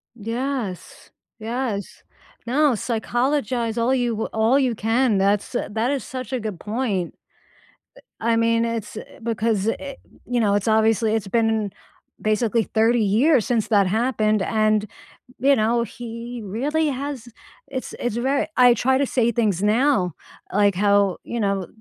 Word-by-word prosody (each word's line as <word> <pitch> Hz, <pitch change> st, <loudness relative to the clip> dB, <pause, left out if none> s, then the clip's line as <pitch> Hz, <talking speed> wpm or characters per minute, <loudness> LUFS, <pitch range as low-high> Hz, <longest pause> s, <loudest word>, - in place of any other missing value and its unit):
Yes. 230 Hz, -3 st, -5 dB, 0.3 s
Yes. 225 Hz, -2 st, -4 dB, 0.4 s
No, 280 Hz, +3 st, +3 dB
psychologize 240 Hz, +1 st, -1 dB
all 235 Hz, +3 st, +2 dB
you 245 Hz, -2 st, +1 dB
w 220 Hz, -1 st, -2 dB
all 220 Hz, +4 st, +3 dB
you 255 Hz, -3 st, +1 dB
can, 225 Hz, 0 st, +1 dB
that's 200 Hz, +1 st, +1 dB
a -, -, -2 dB
that 225 Hz, +4 st, 0 dB
is 275 Hz, -5 st, -2 dB
such 255 Hz, 0 st, -7 dB
a 255 Hz, -, 0 dB
good 210 Hz, -6 st, -5 dB
point. 210 Hz, -6 st, -2 dB, 1.1 s
Eh, -, -, -2 dB
I -, -, +3 dB
mean, 230 Hz, 0 st, +2 dB
it's, 230 Hz, -2 st, -4 dB
eh -, -, -10 dB
because, 225 Hz, -2 st, 0 dB
eh 280 Hz, -1 st, -7 dB, 0.3 s
you 245 Hz, -1 st, -1 dB
know, 205 Hz, -3 st, +2 dB
it's 205 Hz, +1 st, 0 dB
obviously 220 Hz, 0 st, +3 dB
it's 210 Hz, -3 st, -2 dB
been, 225 Hz, -2 st, +1 dB, 0.5 s
basically, 220 Hz, +1 st, +1 dB
30 225 Hz, +3 st, +2 dB
years 230 Hz, +5 st, +3 dB
since 230 Hz, -4 st, 0 dB
that 205 Hz, -3 st, +4 dB
happened 215 Hz, -1 st, +1 dB
and, 215 Hz, 0 st, +1 dB, 0.5 s
you 275 Hz, +2 st, +4 dB
know, 230 Hz, +1 st, +2 dB
he 235 Hz, +1 st, -7 dB
really 290 Hz, +10 st, -1 dB
has 275 Hz, -3 st, -4 dB, 0.4 s
it's 260 Hz, -2 st, -5 dB
it's 240 Hz, -2 st, -2 dB
very 270 Hz, +4 st, 0 dB
I 245 Hz, -1 st, +6 dB
try 260 Hz, +3 st, +2 dB
to 280 Hz, -, +1 dB
say 235 Hz, -2 st, +1 dB
things 210 Hz, -6 st, +1 dB
now 210 Hz, -, +2 dB, 0.4 s
like 205 Hz, 0 st, +3 dB
how 200 Hz, -1 st, +3 dB
you 235 Hz, -, -4 dB
know, 195 Hz, -3 st, 0 dB
230 Hz, 155 wpm, -22 LUFS, 210-250 Hz, 1.1 s, I